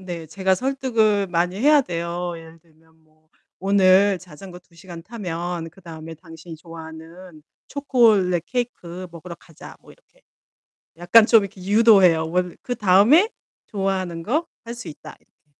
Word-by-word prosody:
네. 175 Hz, -3 st, -7 dB
제가 190 Hz, +4 st, 0 dB
설득을 225 Hz, -4 st, 0 dB
많이 180 Hz, +1 st, -1 dB
해야 295 Hz, +2 st, +5 dB
돼요. 175 Hz, -2 st, -4 dB
예를 165 Hz, 0 st, -14 dB
들면 160 Hz, 0 st, -29 dB
뭐 155 Hz, 0 st, -34 dB, 0.3 s
"오늘 195 Hz, 0 st, +3 dB
자전거 180 Hz, +1 st, -13 dB
2 175 Hz, -1 st, -28 dB
시간 170 Hz, 0 st, -11 dB
타면 175 Hz, -5 st, -6 dB
그다음에 165 Hz, -2 st, -11 dB
당신이 165 Hz, 0 st, -12 dB
좋아하는 165 Hz, +1 st, -12 dB, 0.3 s
초콜릿 220 Hz, -, +2 dB
케이크 185 Hz, -8 st, -5 dB
먹으러 170 Hz, +1 st, -10 dB
가자." 165 Hz, -3 st, -14 dB
뭐 -, -, -17 dB
이렇게. -, -, -29 dB, 0.8 s
약간 180 Hz, +6 st, +5 dB
좀 225 Hz, -2 st, +6 dB
이렇게 195 Hz, -1 st, -9 dB
유도해요. 195 Hz, -6 st, +4 dB
원 180 Hz, 0 st, -2 dB
"그다음에 240 Hz, -, +3 dB, 0.4 s
좋아하는 190 Hz, -4 st, -3 dB
거 295 Hz, -, -1 dB, 0.2 s
할 235 Hz, -, -6 dB
수 240 Hz, -1 st, -9 dB
있다." 155 Hz, 0 st, -11 dB
이 -, -, -40 dB
180 Hz, 295 characters per minute, -22 LUFS, 165-210 Hz, 0.8 s, 좀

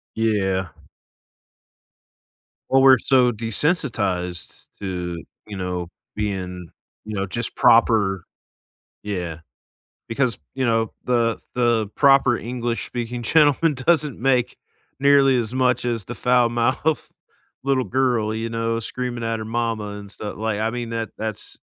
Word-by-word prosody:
Yeah. 95 Hz, -5 st, 0 dB, 2.0 s
Well, 135 Hz, 0 st, +4 dB
we're 130 Hz, -2 st, +8 dB
so 125 Hz, -2 st, +4 dB
desensitized 110 Hz, -, -2 dB
to, 90 Hz, -4 st, -4 dB, 0.2 s
you 105 Hz, -2 st, -7 dB
know, 90 Hz, -2 st, -3 dB, 0.3 s
being, 90 Hz, -4 st, -4 dB, 0.4 s
you 110 Hz, 0 st, -6 dB
know, 95 Hz, 0 st, -1 dB
just 115 Hz, +5 st, -5 dB
proper 105 Hz, -6 st, +4 dB, 0.8 s
Yeah. 90 Hz, -6 st, -4 dB, 0.7 s
Because, 120 Hz, -1 st, 0 dB, 0.2 s
you 130 Hz, -1 st, -1 dB
know, 115 Hz, -1 st, +1 dB
the 120 Hz, -2 st, +1 dB, 0.2 s
the 120 Hz, -3 st, +2 dB
proper 135 Hz, -4 st, +5 dB
English-speaking 120 Hz, 0 st, -4 dB
gentleman 150 Hz, +3 st, +4 dB
doesn't 145 Hz, -1 st, +1 dB
make 125 Hz, -1 st, +1 dB, 0.4 s
nearly 140 Hz, -1 st, +5 dB
as 115 Hz, 0 st, -3 dB
much 125 Hz, -2 st, +2 dB
as 115 Hz, -4 st, -2 dB
the 120 Hz, -, -6 dB
foul-mouthed 125 Hz, +4 st, +1 dB, 0.5 s
little 135 Hz, -1 st, +1 dB
girl, 120 Hz, -2 st, +1 dB
you 115 Hz, +1 st, -3 dB
know, 115 Hz, 0 st, -1 dB
screaming 120 Hz, +1 st, -4 dB
at 115 Hz, 0 st, -1 dB
her 110 Hz, -, -5 dB
mama 115 Hz, -1 st, -2 dB
and 100 Hz, -1 st, -10 dB
stu 105 Hz, 0 st, -6 dB
Like, 110 Hz, -1 st, -2 dB
I 110 Hz, +1 st, +1 dB
mean, 120 Hz, 0 st, -5 dB
that 115 Hz, -1 st, -3 dB
that's 110 Hz, -1 st, -6 dB
115 Hz, 125 wpm, -22 LUFS, 105-125 Hz, 2.0 s, we're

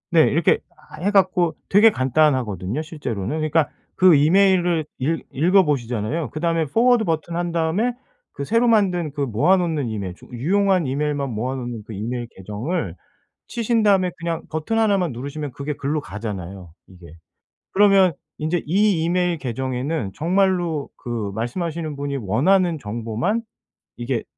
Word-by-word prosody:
네 165 Hz, -2 st, +6 dB
이렇게 160 Hz, +3 st, +3 dB, 0.2 s
하 -, -, -14 dB
해 195 Hz, -, +1 dB
갖고 185 Hz, -4 st, +2 dB
되게 210 Hz, +3 st, +7 dB
간단하거든요 130 Hz, -, +1 dB
실제로는. 145 Hz, -, -4 dB
그러니까 155 Hz, 0 st, +1 dB, 0.3 s
그 185 Hz, -2 st, +6 dB
이메일을 175 Hz, +1 st, +3 dB
읽 155 Hz, +5 st, -1 dB
읽어보시잖아요. 145 Hz, -, +1 dB
그다음에 165 Hz, +1 st, 0 dB
Forward 230 Hz, -, +3 dB
버튼 165 Hz, 0 st, -2 dB
한 175 Hz, 0 st, -1 dB
다음에 170 Hz, +9 st, +1 dB, 0.4 s
그 -, -, -5 dB
새로 230 Hz, -, +2 dB
만든 185 Hz, -8 st, +2 dB
그 145 Hz, -, -4 dB
모아 135 Hz, -, +3 dB
놓는 165 Hz, -7 st, -1 dB
이메일 100 Hz, -5 st, -4 dB
쪽 125 Hz, -, -17 dB
유용한 190 Hz, +5 st, +2 dB
이메일만 145 Hz, +1 st, -1 dB
모아 125 Hz, +5 st, -2 dB
놓은 120 Hz, -4 st, -5 dB
그 110 Hz, -, -7 dB
이메일 120 Hz, +4 st, -4 dB
계정을 105 Hz, -, -4 dB, 0.5 s
치신 230 Hz, -1 st, 0 dB
다음에 195 Hz, -3 st, +3 dB
그냥 165 Hz, -1 st, -3 dB
버튼 160 Hz, +8 st, -2 dB
하나만 200 Hz, -6 st, +2 dB
누르시면 140 Hz, +4 st, -5 dB
그게 140 Hz, +4 st, -4 dB
글로 145 Hz, +3 st, -2 dB
가잖아요 95 Hz, -, -7 dB
이게. 90 Hz, -2 st, -15 dB, 0.7 s
그러면 195 Hz, -3 st, +5 dB, 0.2 s
인제 160 Hz, +2 st, -1 dB
이 190 Hz, 0 st, +2 dB
이메일 175 Hz, 0 st, +1 dB
계정에는 130 Hz, -1 st, -3 dB
정말로 175 Hz, -3 st, +1 dB
그 115 Hz, -4 st, -4 dB
말씀하시는 155 Hz, +6 st, -3 dB
분이 140 Hz, 0 st, -3 dB
원하는 160 Hz, -, +2 dB
정보만 115 Hz, -, -2 dB, 0.6 s
이게 120 Hz, -1 st, -2 dB
155 Hz, 355 characters per minute, -22 LUFS, 125-180 Hz, 0.7 s, 되게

